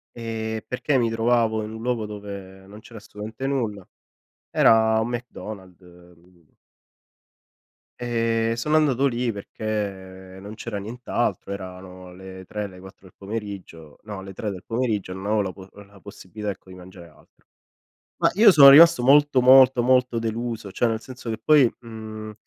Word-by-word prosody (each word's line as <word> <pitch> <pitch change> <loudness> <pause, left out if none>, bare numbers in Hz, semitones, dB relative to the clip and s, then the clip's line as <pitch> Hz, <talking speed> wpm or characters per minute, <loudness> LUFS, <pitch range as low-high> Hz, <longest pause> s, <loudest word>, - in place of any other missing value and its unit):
Ehm, 110 -1 -4
perché 135 +2 -1
mi 120 -2 +1
trovavo 115 -1 +1
in 105 - -7
un 110 - -8
luogo 120 -2 -2
dove 100 -2 -9
non 105 +2 -12
c'era 115 +1 -13
assolutamente 110 +4 -7
nulla. 110 -8 -3 0.6
Era 110 0 +4
un 110 - -2
McDonald, 110 -6 -8
mhmm 90 -1 -21 1.4
Ehm, 115 -1 0
sono 150 +7 +1
andato 140 -3 +2
lì 120 -2 -1
perché, 95 -3 -6
ehm, - - -12
non 105 +2 -9
c'era 110 -2 -6
nient'altro, 110 -2 -3
erano 90 -1 -9
le 95 0 -11
3 105 +2 -5
le 90 -2 -14
4 95 +1 -14
del 90 - -20
pomeriggio, 100 -7 -8
no 105 -3 -8
le 95 0 -10
3 105 +3 -4
del 95 -3 -8
pomeriggio 115 -6 -2
non 95 +1 -8
avevo 110 0 +1
la 95 -2 -3
po 95 0 -13
la 100 0 -19
possibilità 105 +1 -7
ecco 95 - -13
di 95 - -11
mangiare 90 -1 -13
altro. 75 - -26 0.8
Ma - - +4
io 210 +3 +7
sono 145 -6 +9
rimasto 155 -2 +7
molto, 140 +1 +4
molto, 130 0 +6
molto 125 -1 +2
deluso, 115 -2 -4
cioè 120 - +1
nel 110 -1 -2
senso 125 -1 -9
che 110 - -4
poi, 145 -6 +4
mhmm, 110 -2 -9
110 Hz, 165 wpm, -23 LUFS, 95-120 Hz, 1.4 s, sono